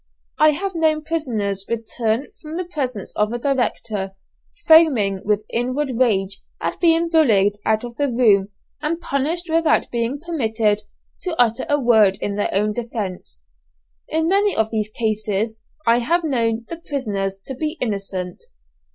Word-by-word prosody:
I 310 Hz, 0 st, +6 dB
have 385 Hz, +5 st, -3 dB
known 315 Hz, -2 st, +1 dB
prisoners 225 Hz, -12 st, -1 dB
return 230 Hz, +2 st, -1 dB
from 310 Hz, +2 st, -6 dB
the 365 Hz, -, -2 dB
presence 260 Hz, -, -4 dB
of 210 Hz, +1 st, +1 dB
a 240 Hz, -, -2 dB
director, 230 Hz, -7 st, -1 dB, 0.5 s
foaming 255 Hz, -, +5 dB
with 210 Hz, 0 st, 0 dB
inward 255 Hz, +4 st, -1 dB
rage 200 Hz, -5 st, +1 dB, 0.2 s
at -, -, -3 dB
being 335 Hz, -1 st, +4 dB
bullied 210 Hz, -, +3 dB
out 220 Hz, +1 st, +2 dB
of 240 Hz, -1 st, -8 dB
the 285 Hz, -, +1 dB
room 220 Hz, -6 st, +3 dB, 0.3 s
and 315 Hz, +2 st, -1 dB
punished 325 Hz, +4 st, 0 dB
without 325 Hz, -1 st, +2 dB
being 235 Hz, +4 st, -1 dB
permitted 225 Hz, -10 st, 0 dB, 0.4 s
to 350 Hz, -3 st, -3 dB
utter 240 Hz, +3 st, +2 dB
a 290 Hz, 0 st, +3 dB
word 220 Hz, -6 st, +4 dB
in 200 Hz, -, -2 dB
their 205 Hz, -, 0 dB
own 210 Hz, +2 st, +1 dB
defence. 200 Hz, -, -5 dB, 0.6 s
In 320 Hz, +1 st, 0 dB
many 400 Hz, +3 st, +3 dB
of 220 Hz, 0 st, +1 dB
these 215 Hz, -2 st, -1 dB
cases 215 Hz, 0 st, -1 dB, 0.3 s
I 230 Hz, +1 st, +4 dB
have 335 Hz, +8 st, +1 dB
known 230 Hz, -6 st, 0 dB
the 335 Hz, -, -6 dB
prisoners 200 Hz, -9 st, -2 dB
to 270 Hz, -, -5 dB
be 305 Hz, +5 st, -3 dB
innocent. 195 Hz, -5 st, -3 dB
235 Hz, 150 wpm, -21 LUFS, 210-305 Hz, 0.6 s, I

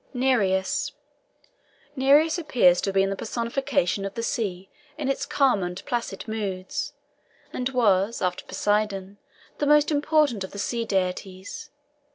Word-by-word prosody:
NEREUS. 205 Hz, -8 st, +1 dB, 1.0 s
Nereus 295 Hz, +5 st, +4 dB
appears 230 Hz, -, +4 dB
to -, -, -2 dB
have 195 Hz, -, -2 dB
been 195 Hz, 0 st, +3 dB
the -, -, -1 dB
personification 230 Hz, -3 st, -1 dB
of 195 Hz, +2 st, -5 dB
the 230 Hz, -, -3 dB
sea 195 Hz, -7 st, -2 dB, 0.3 s
in 295 Hz, -4 st, -3 dB
its 275 Hz, +1 st, -1 dB
calm 265 Hz, -8 st, +3 dB
and 180 Hz, +1 st, -5 dB
placid 240 Hz, -1 st, -3 dB
moods, 195 Hz, -4 st, -3 dB, 0.6 s
and 250 Hz, 0 st, -1 dB
was, 220 Hz, -4 st, +2 dB
after 180 Hz, -1 st, -1 dB
Poseidon, 205 Hz, -2 st, -1 dB, 0.4 s
the 290 Hz, -, +1 dB
most 295 Hz, +1 st, +5 dB
important 295 Hz, -7 st, +2 dB
of 190 Hz, -, -8 dB
the -, -, -7 dB
sea 230 Hz, +3 st, -2 dB
deities. 190 Hz, +6 st, -3 dB
215 Hz, 140 wpm, -25 LUFS, 190-265 Hz, 1.0 s, most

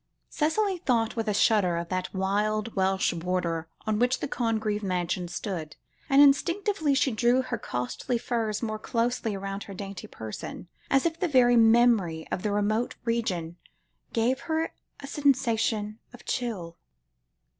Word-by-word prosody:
Cicely 365 Hz, +5 st, +1 dB
thought 230 Hz, -8 st, +1 dB
with 225 Hz, -1 st, -2 dB
a 210 Hz, -, +1 dB
shudder 195 Hz, -6 st, +3 dB
of 170 Hz, 0 st, -4 dB
that 185 Hz, 0 st, -2 dB
wild 210 Hz, +3 st, -1 dB
Welsh 190 Hz, -1 st, +2 dB
border 170 Hz, -1 st, -2 dB, 0.2 s
on 215 Hz, -1 st, 0 dB
which 250 Hz, +2 st, +2 dB
the -, -, -2 dB
Congreve 220 Hz, -4 st, -1 dB
mansion 180 Hz, -2 st, -1 dB
stood, 175 Hz, -3 st, -5 dB, 0.3 s
and 275 Hz, 0 st, +5 dB
instinctively 320 Hz, +2 st, +2 dB
she 270 Hz, 0 st, +2 dB
drew 240 Hz, +3 st, +3 dB
her 250 Hz, -2 st, -4 dB
costly 125 Hz, -, -2 dB
furs 225 Hz, -2 st, -2 dB
more 215 Hz, -1 st, -2 dB
closely 230 Hz, -2 st, -1 dB
round 195 Hz, +1 st, -5 dB
her 200 Hz, -, -9 dB
dainty 195 Hz, 0 st, -7 dB
person, 110 Hz, -, -7 dB, 0.2 s
as 270 Hz, +2 st, +3 dB
if 330 Hz, 0 st, 0 dB
the 365 Hz, -, +1 dB
very 250 Hz, -5 st, +5 dB
memory 225 Hz, -8 st, +4 dB
of -, -, -2 dB
the 210 Hz, -, -1 dB
remote 215 Hz, +3 st, 0 dB
region 180 Hz, -8 st, -1 dB, 0.5 s
gave 240 Hz, +4 st, +1 dB
her 320 Hz, +1 st, 0 dB, 0.3 s
a -, -, -7 dB
sensation 230 Hz, -7 st, +1 dB
of 245 Hz, -, -14 dB
chill. 190 Hz, -9 st, -3 dB
220 Hz, 150 wpm, -27 LUFS, 190-250 Hz, 0.5 s, and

